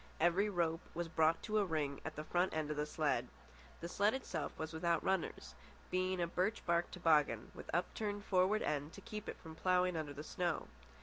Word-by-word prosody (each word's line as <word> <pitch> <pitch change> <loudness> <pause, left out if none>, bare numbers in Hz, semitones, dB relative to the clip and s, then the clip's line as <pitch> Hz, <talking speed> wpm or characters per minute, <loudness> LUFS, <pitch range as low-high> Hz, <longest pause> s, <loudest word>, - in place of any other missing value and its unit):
Every 175 +5 +4
rope 170 -3 +1
was 170 0 -1
brought 160 0 +3
to 215 -1 +1
a - - +4
ring 150 -5 -1
at 160 - -5
the 150 - -4
front 175 +2 +1
end 155 -1 -1
of 150 - -3
the 150 0 0
sled. - - +1 0.5
The 170 - -3
sled 205 +6 +2
itself 265 - -3
was 160 0 -4
without 165 0 +1
runners, 190 -2 -1 0.4
being 185 0 +1
a 170 - +2
birch 185 +6 -1
bark 170 0 +2
toboggan, 150 - +2
with - - -10
upturned 205 +4 -1
forward 190 +3 +3
end 150 +1 -1
to - - -10
keep 210 0 -6
it - - -5
from 160 -1 -10
ploughing 180 +1 +2
under 155 -3 -3
the 150 - -6
snow. 175 0 -1
170 Hz, 200 wpm, -37 LUFS, 160-185 Hz, 0.5 s, Every